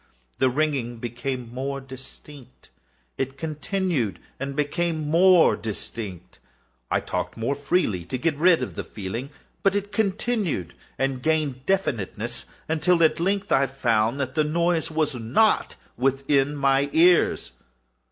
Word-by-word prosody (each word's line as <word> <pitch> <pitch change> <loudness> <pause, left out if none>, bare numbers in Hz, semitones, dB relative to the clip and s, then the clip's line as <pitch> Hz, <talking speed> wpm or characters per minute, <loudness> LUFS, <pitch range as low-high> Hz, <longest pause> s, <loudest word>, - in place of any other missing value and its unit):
The 130 - +4
ringing 130 -4 -1
became 120 +1 -5
more 135 +2 -3
distinct:—it 135 - -10
continued 160 - -2 0.2
and 135 +1 -4
became 155 +1 -1
more 175 +2 +6
distinct: 105 -3 -7 0.5
I - - +2
talked - - -4
more 115 +5 0
freely 140 - 0
to 110 - -3
get 155 +3 0
rid 165 -1 +4
of - - -5
the - - -4
feeling: 110 +7 -6 0.3
but 195 -1 +2
it 205 0 -2
continued 200 - -1 0.2
and 135 -1 -1
gained 145 -4 0
definiteness—until, 150 - 0
at 160 - +3
length, 195 +3 0
I 135 0 +4
found 120 -2 +1
that 130 -2 -2
the 155 - +2
noise 170 +2 +1
was 155 -2 0
not 125 - +2 0.2
within 135 +2 +1
my 140 0 +2
ears. 170 - +4
140 Hz, 125 wpm, -24 LUFS, 125-165 Hz, 0.5 s, more